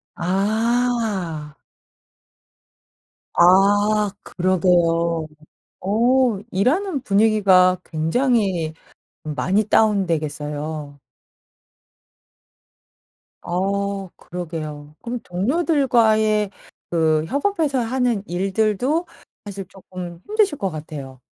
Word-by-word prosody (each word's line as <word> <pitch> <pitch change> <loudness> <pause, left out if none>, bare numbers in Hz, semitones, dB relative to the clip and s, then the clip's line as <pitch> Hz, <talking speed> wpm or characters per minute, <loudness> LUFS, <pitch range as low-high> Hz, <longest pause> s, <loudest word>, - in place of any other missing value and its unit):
아. 200 -4 -1 1.8
아 205 +3 +4
그러게요. 170 -3 +1 0.5
어 235 +2 +2
일하는 280 - +1
분위기가 195 -5 +4
굉장히 175 - 0 0.5
많이 185 +7 0
다운되겠어요. 155 -8 -1 2.5
어 195 +2 -2
그러게요. 155 -4 -7
그럼 240 0 -4
동료들과의 220 - +2 0.4
그 160 -2 +2
협업해서 285 - 0
하는 240 -3 0
일들도 215 - 0 0.4
사실 200 -1 -6
쪼끔 180 -2 -9
힘드실 420 -8 +1
것 195 - -1
같아요. 145 -5 -8
195 Hz, 165 characters per minute, -21 LUFS, 170-230 Hz, 2.5 s, 아